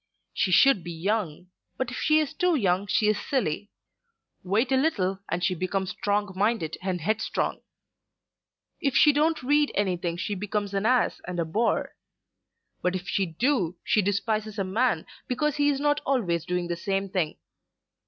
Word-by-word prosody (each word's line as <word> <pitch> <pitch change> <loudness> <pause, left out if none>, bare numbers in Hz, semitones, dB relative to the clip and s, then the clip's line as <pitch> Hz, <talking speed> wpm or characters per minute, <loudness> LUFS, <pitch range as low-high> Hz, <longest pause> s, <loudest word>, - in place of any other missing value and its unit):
She 190 - 0
should 215 0 +5
be 175 - -6
young; 180 -1 -2 0.3
but 260 -2 -2
if 255 - -5
she 310 0 +3
is 305 -1 -1
too 355 +2 +2
young 195 -5 +1
she 210 - +2
is 210 -1 +2
silly: 205 - -1 0.7
wait 215 +8 +1
a - - +4
little 195 - +1
and 170 +2 -2
she 185 - +2
becomes 185 +1 -2
strong 205 +1 -1
minded 200 -5 0
and 185 -1 -2
headstrong. 215 +6 -1 1.2
If 275 -3 0
she 295 - +6
don't 310 0 +1
read 290 +3 +3
anything 180 -4 -1
she 205 - -2
becomes 205 +1 -3
an 200 +2 +1
ass 250 0 +2
and 180 -1 -4
a 170 - +1
bore; 215 +9 0 0.9
but 180 0 0
if 180 0 -5
she 190 +1 0
do 180 - 0
she 210 - +3
despises 215 +2 -1
a 195 - 0
man 190 -2 0 0.2
because 295 +4 0
he 290 0 +3
is 280 -2 0
not 290 0 +1
always 185 - 0
doing 180 -1 -1
the 170 - -2
same 195 +3 -2
thing. 180 -5 -2
205 Hz, 175 wpm, -26 LUFS, 180-255 Hz, 1.2 s, she